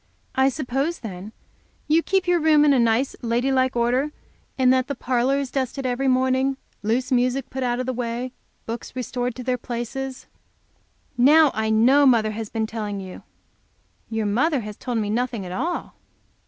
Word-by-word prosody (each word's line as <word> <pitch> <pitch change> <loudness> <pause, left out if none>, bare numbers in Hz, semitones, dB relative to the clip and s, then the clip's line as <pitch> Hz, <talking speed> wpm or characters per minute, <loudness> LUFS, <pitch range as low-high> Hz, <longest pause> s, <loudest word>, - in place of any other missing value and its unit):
"I 265 +1 +3
suppose, 275 +4 -2
then, 200 -2 -7 0.6
you 315 +2 +4
keep 380 +1 0
your 355 -1 +3
room 305 -2 +5
in 295 - +5
nice 230 +4 +1
lady 240 +2 0
like 260 -1 +2
order, 250 +5 +1 0.5
and 255 -1 +4
that 255 -1 +1
the 280 - -3
parlor 255 +2 +1
is 275 -2 -3
dusted 270 0 -2
every 255 +2 0
morning, 260 +1 +2 0.2
loose 235 +5 -1
music 255 +1 +1
put 265 - -4
out 245 -1 0
of 255 - -2
the 260 - -2
way, 245 +1 -3 0.3
books 230 +2 -6
restored 245 0 -3
to 255 - -7
their 250 0 -1
places 250 +3 -5 0.5
" - - -40 0.2
"Now 315 -3 +6
I 220 0 -1
know 255 +6 +5
mother 225 -4 +3
has 220 0 -5
been 225 -1 -1
telling 210 -2 -4
you." 190 -1 -9 0.9
"Your 225 -1 -2
mother 260 +7 +1
has 210 -1 -7
told 245 +2 -3
me 210 -2 -1
nothing 235 -3 -2
at 180 - -7
all." 330 - -3
250 Hz, 180 wpm, -23 LUFS, 230-270 Hz, 0.9 s, Now